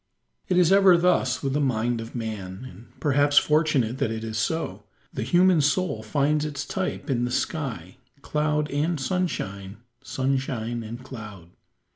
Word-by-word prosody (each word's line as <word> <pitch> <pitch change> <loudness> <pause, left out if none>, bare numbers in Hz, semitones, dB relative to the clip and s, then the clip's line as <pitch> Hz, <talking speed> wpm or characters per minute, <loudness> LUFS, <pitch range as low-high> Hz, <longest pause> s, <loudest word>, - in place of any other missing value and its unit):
It 180 - +1
is 180 -1 +5
ever 195 -2 +7
thus 150 -8 +2
with 135 -1 -1
the 145 - +1
mind 120 -3 0
of 115 +2 -9
man, 110 -2 -5
and 110 +2 -16
perhaps 145 0 +2
fortunate 145 -6 +3
that 140 - +1
it 110 0 -4
is 110 -1 -5
so. 160 +9 -2 0.3
The - - -4
human 180 -2 +4
soul 145 - 0
finds 145 +7 +1
its 145 -2 -4
type 190 +3 -3
in 125 -4 0
the 120 - -1
sky 125 - -3 0.3
cloud 150 0 0
and 150 +3 0
sunshine, 110 - -3 0.3
sunshine 130 -3 -2
and 115 +3 -8
cloud. 105 -10 -10
135 Hz, 155 wpm, -25 LUFS, 115-155 Hz, 0.3 s, ever